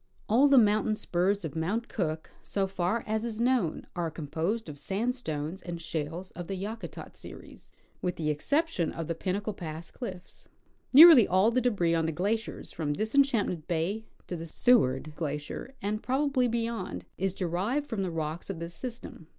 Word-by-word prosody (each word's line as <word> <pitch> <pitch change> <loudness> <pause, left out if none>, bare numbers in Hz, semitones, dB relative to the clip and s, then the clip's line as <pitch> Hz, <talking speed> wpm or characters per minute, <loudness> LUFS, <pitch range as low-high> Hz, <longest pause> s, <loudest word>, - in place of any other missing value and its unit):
All 250 +7 +5
the 275 -1 +6
mountain 215 -1 +4
sjjurs 190 0 0
of 155 - -6
Mount 200 +9 -1
Cook, 160 -6 -3
so 195 -1 -1
far 190 +3 -1
as 220 0 -1
is 230 -2 -4
knoAvn, 240 -9 +1
are 170 -2 -1
composed 165 +8 -3
of 145 -2 -8
sandstones 190 - -2
and 175 -1 -6
shales 165 +3 -4
of 175 -1 -7
the 195 - -3
Yakutat 215 +4 -6
series, - - -11 0.3
with 180 -1 -1
the 155 -2 0
exception 275 - 0
of 165 -2 -5
the 165 - -1
Pinnacle 200 +5 -2
pass 165 -3 -7
cliffs. 185 -8 -8 0.4
Nearly 295 -4 +10
all 190 +5 +4
the 255 +2 +2
debris 195 -9 +2
on 165 -1 +1
the - - 0
glaciers 205 +8 -2
from 150 -3 -2
Disenchantment 220 - +1
bay 180 +7 -1 0.2
to 180 - -4
the 165 0 -6
Seward 155 - +3
glacier, 150 - -5
and 210 +2 -1
probably 265 -1 +1
beyond, 230 - -3
is 190 0 0
derived 195 - -1
from 225 -7 -2
the 190 - -1
rocks 160 +1 -4
of 195 - -3
this 170 +1 -6
system. 235 -9 -8
190 Hz, 170 wpm, -29 LUFS, 165-230 Hz, 0.4 s, Nearly